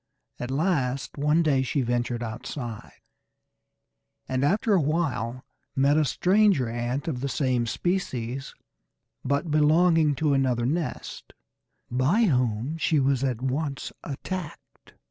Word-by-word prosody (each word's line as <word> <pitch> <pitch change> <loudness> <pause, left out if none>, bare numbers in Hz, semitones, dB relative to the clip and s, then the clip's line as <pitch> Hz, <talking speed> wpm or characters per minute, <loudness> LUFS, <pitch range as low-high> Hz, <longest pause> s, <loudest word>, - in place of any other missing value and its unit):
At 125 - -4
last 135 -3 0
one 150 +3 +3
day 140 -4 +3
she 135 +2 0
ventured 120 0 -1
outside, 115 0 -7 1.3
and 130 +1 -1
after 205 +8 +2
a 185 - +4
while 140 -6 -1 0.3
met 140 +2 +3
a 155 0 +3
stranger 185 - +3
ant 120 +5 -3
of 130 -6 -2
the 140 - -2
same 125 -2 0
species, 135 - -2 0.7
but 140 +4 -1
belonging 155 0 +4
to 150 +1 +1
another 130 -3 +1
nest, 155 +5 -3 0.6
by 135 - +2
whom 130 - 0
she 155 -2 +2
was 135 -1 +1
at 125 -3 -1
once 140 +1 -2
attacked. 160 +3 -7
140 Hz, 125 wpm, -26 LUFS, 125-160 Hz, 1.3 s, a